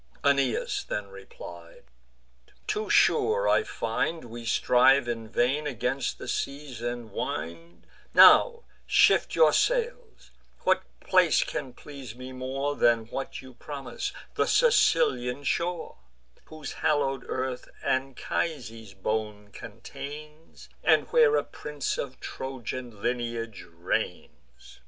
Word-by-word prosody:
Aeneas 140 Hz, -4 st, +1 dB
then 105 Hz, -1 st, -4 dB
replied: 85 Hz, -3 st, -12 dB, 0.8 s
"Too 425 Hz, 0 st, -2 dB
sure 465 Hz, +3 st, +3 dB
I -, -, +4 dB
find 165 Hz, -, -2 dB
We 120 Hz, 0 st, -9 dB
strive 125 Hz, +3 st, +4 dB
in 115 Hz, -2 st, -4 dB
vain 135 Hz, +6 st, +1 dB
against 125 Hz, 0 st, -2 dB
the -, -, -9 dB
seas 140 Hz, -4 st, -4 dB
and 120 Hz, -2 st, -4 dB
wind: 85 Hz, -1 st, -5 dB, 0.3 s
Now 470 Hz, -1 st, +7 dB, 0.2 s
shift -, -, +4 dB
your -, -, +5 dB
sails; -, -, -1 dB, 0.3 s
what -, -, +3 dB, 0.2 s
place -, -, +4 dB
can 135 Hz, -, -5 dB
please 135 Hz, -5 st, -10 dB
me 130 Hz, +1 st, -9 dB
more 135 Hz, +3 st, -3 dB
Than 115 Hz, -3 st, +3 dB
what 135 Hz, +1 st, -5 dB
you 130 Hz, -1 st, -12 dB
promise, 140 Hz, +2 st, -6 dB, 0.2 s
the -, -, +1 dB
Sicilian 145 Hz, -, +3 dB
shore, 170 Hz, +4 st, -2 dB, 0.5 s
Whose 155 Hz, -2 st, -8 dB
hallow'd 135 Hz, -4 st, 0 dB
earth 130 Hz, -1 st, -3 dB
Anchises' 130 Hz, -, -3 dB
bones 105 Hz, +1 st, -3 dB
contains, 150 Hz, +2 st, -10 dB, 0.2 s
And -, -, +4 dB
where 470 Hz, -2 st, +5 dB
a -, -, +2 dB
prince 150 Hz, -2 st, -4 dB
of 130 Hz, -2 st, -5 dB
Trojan 125 Hz, -4 st, -6 dB
lineage 120 Hz, -3 st, -3 dB
reigns?" 80 Hz, -8 st, -5 dB
130 Hz, 115 wpm, -27 LUFS, 115-150 Hz, 0.8 s, Now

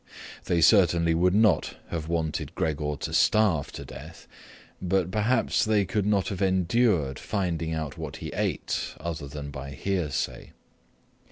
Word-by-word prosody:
They 85 Hz, -1 st, +1 dB
certainly 85 Hz, -2 st, +5 dB
would 90 Hz, +3 st, +3 dB
not 105 Hz, -6 st, +3 dB
have 80 Hz, -2 st, -4 dB
wanted 80 Hz, -2 st, -2 dB
Gregor 75 Hz, -1 st, -1 dB
to -, -, -4 dB
starve 100 Hz, -9 st, +3 dB
to -, -, -7 dB
death, -, -, -11 dB, 0.5 s
but 95 Hz, -1 st, 0 dB
perhaps 115 Hz, +5 st, +2 dB
they 110 Hz, -3 st, +2 dB
could 105 Hz, +1 st, -1 dB
not 100 Hz, -3 st, +2 dB
have 95 Hz, -2 st, -5 dB
endured 95 Hz, -, +2 dB
finding 85 Hz, -6 st, -2 dB
out 80 Hz, -2 st, -5 dB
what -, -, -5 dB
he -, -, -6 dB
ate -, -, -2 dB
other 80 Hz, -4 st, -5 dB
than 70 Hz, 0 st, -7 dB
by 70 Hz, 0 st, -7 dB
hearsay. 90 Hz, 0 st, -3 dB
85 Hz, 145 wpm, -27 LUFS, 80-100 Hz, 0.5 s, certainly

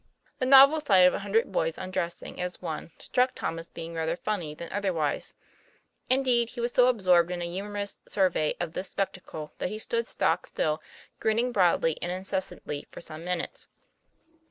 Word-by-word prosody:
The 255 Hz, -, 0 dB
novel 275 Hz, +3 st, +8 dB
sight 195 Hz, -10 st, +6 dB
of 180 Hz, -, +5 dB
a -, -, -2 dB
hundred 205 Hz, +2 st, +1 dB
boys 165 Hz, -3 st, 0 dB
undressing 185 Hz, -2 st, -4 dB
as 180 Hz, 0 st, -4 dB
one 160 Hz, -2 st, -5 dB
struck 255 Hz, +1 st, +1 dB
Tom 165 Hz, -, -3 dB
as 165 Hz, -, -9 dB
being 165 Hz, 0 st, -7 dB
rather 165 Hz, +1 st, -1 dB
funny 180 Hz, -9 st, -3 dB
than 170 Hz, +1 st, -8 dB
otherwise. 180 Hz, -7 st, -1 dB, 0.7 s
Indeed 250 Hz, -3 st, +3 dB
he 245 Hz, -, -9 dB
was 240 Hz, +1 st, 0 dB
so 250 Hz, 0 st, +5 dB
absorbed 185 Hz, -8 st, +4 dB
in 180 Hz, -1 st, -3 dB
a -, -, -2 dB
humorous 200 Hz, +3 st, -4 dB
survey 180 Hz, -6 st, +1 dB
of 160 Hz, -, -3 dB
this 185 Hz, +1 st, -3 dB
spectacle 180 Hz, -5 st, -4 dB
that -, -, -1 dB
he 215 Hz, -, -5 dB
stood 465 Hz, -, -1 dB
stock -, -, 0 dB
still, 155 Hz, 0 st, -1 dB, 0.4 s
grinning 230 Hz, +3 st, +1 dB
broadly 175 Hz, -6 st, +2 dB
and 175 Hz, -, -2 dB
incessantly 185 Hz, -5 st, -4 dB
for -, -, -10 dB
some 160 Hz, -1 st, -9 dB
minutes. 180 Hz, -1 st, -4 dB
185 Hz, 175 wpm, -28 LUFS, 170-220 Hz, 0.7 s, novel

